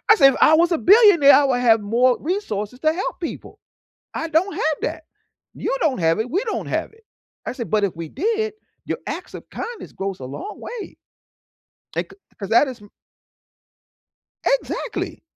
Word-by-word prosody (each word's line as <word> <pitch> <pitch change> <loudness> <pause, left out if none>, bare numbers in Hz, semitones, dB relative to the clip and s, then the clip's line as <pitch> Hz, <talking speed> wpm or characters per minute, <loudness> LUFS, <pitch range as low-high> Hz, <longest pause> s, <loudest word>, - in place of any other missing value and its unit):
said, 275 -9 +6
"If - - -5
I 310 - +6
was 335 +3 +4
a 335 - +2
billionaire, 380 -7 +7
I 290 - +6
would 250 -2 +1
have 225 -3 +4
more 240 +5 +2
resources 250 - -3
to 310 0 +2
help 365 +1 -4
people. 340 - -7 0.6
I 325 - -3
don't 330 +5 +1
have 310 -2 0
that. - - -3 0.5
You - - -3
don't 275 -8 +1
have 165 +1 +2
it. 225 +3 -2
We 370 - 0
don't 450 - -3
have - - -2
it." 445 0 -24 0.4
I - - -3
said, 240 -3 -6
"But 210 -1 +2
if 195 - -4
we 165 -1 -7
did, 435 - -1 0.3
your - - -3
acts - - -6
of - - -10
kindness 475 -1 -7
goes 195 -1 -4
a 130 - -7
long 140 - -7
way." 460 -5 -8 1.0
Like, - - -3 0.3
'cause 195 - -5
that 235 +6 +5
is 250 -5 -8
m 205 - -16 1.6
Exactly. - - -2
290 Hz, 180 wpm, -21 LUFS, -, 1.6 s, billionaire